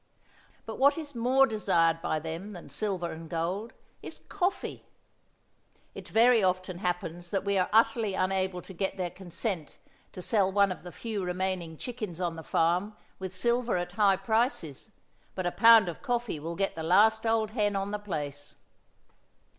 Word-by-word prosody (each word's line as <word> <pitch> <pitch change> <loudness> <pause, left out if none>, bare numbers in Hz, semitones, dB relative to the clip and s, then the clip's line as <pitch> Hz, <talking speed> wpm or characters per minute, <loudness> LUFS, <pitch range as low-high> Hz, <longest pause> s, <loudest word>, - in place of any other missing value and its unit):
But 220 - -6
what 280 +4 +5
is 300 -3 -6
more 255 +3 +4
desired 170 -8 +1
by 155 - -1
them 165 +5 -5
than 175 - -10
silver 190 -5 -2
and 160 0 -9
gold 180 +7 -2 0.3
is - - -9
coffee. 385 0 -2 1.1
It - - -9
very 230 -1 +5
often 185 -1 0
happens 175 -2 -3
that 195 +1 -1
we 200 0 +1
are 180 - +1
utterly 225 -2 +3
unable 185 -1 -1
to 190 - -11
get 190 +3 -2
their 180 -2 -2
consent 175 -2 -5 0.4
to 180 - -8
sell 195 -3 +2
one 200 0 +3
of 185 - -6
the 175 - -9
few 215 -2 -4
remaining 180 -2 -2
chickens 215 -7 -6
on 175 -2 -1
the 165 - -7
farm 180 +7 0 0.2
with 190 -1 -6
silver 235 +3 +1
at 175 0 -3
high 200 -1 +3
prices, 220 - -1 0.5
but 185 - -3
a 175 - +1
pound 225 -1 +7
of 170 - -6
coffee 240 - -2
will 165 +3 -5
get 195 +2 -1
the 160 - -5
last 215 +7 +4
old 225 -1 +1
hen 210 -3 0
on 195 +1 -2
the 210 - -2
place. 145 -7 -5
190 Hz, 170 wpm, -29 LUFS, 175-220 Hz, 1.1 s, pound